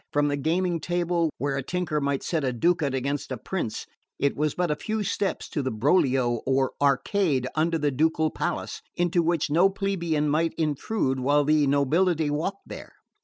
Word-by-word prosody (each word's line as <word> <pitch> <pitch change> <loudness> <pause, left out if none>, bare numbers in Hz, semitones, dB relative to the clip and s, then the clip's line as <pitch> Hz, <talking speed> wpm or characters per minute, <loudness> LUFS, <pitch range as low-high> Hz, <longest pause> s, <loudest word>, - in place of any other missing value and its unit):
From 145 0 +2
the 145 - 0
gaming 170 +4 0
table 175 0 0
where 140 -1 -1
a - - -1
tinker 170 +1 -2
might 140 -1 -1
set 160 -4 -1
a 130 - +1
ducat 145 +2 +1
against 135 +1 -3
a 130 - -2
prince 145 - -4 0.3
it 140 - 0
was 150 0 -1
but 175 -3 0
a - - +1
few 215 +7 -3
steps 200 0 -2
to 150 - -2
the 130 - -1
Broglio, 130 -1 +2
or 135 0 +2
arcade 140 - +2
under 165 +1 +1
the 145 -2 0
ducal 160 +3 +1
palace, - - -3
into 175 0 +2
which 165 -3 0
no 175 +5 +5
plebeian 170 -6 -1
might 160 +3 +1
intrude 150 -2 -1
while 145 +3 +3
the 150 0 +3
nobility 155 +3 +2
walked 175 +7 -3
there. - - -9
155 Hz, 180 wpm, -26 LUFS, 140-175 Hz, 0.3 s, no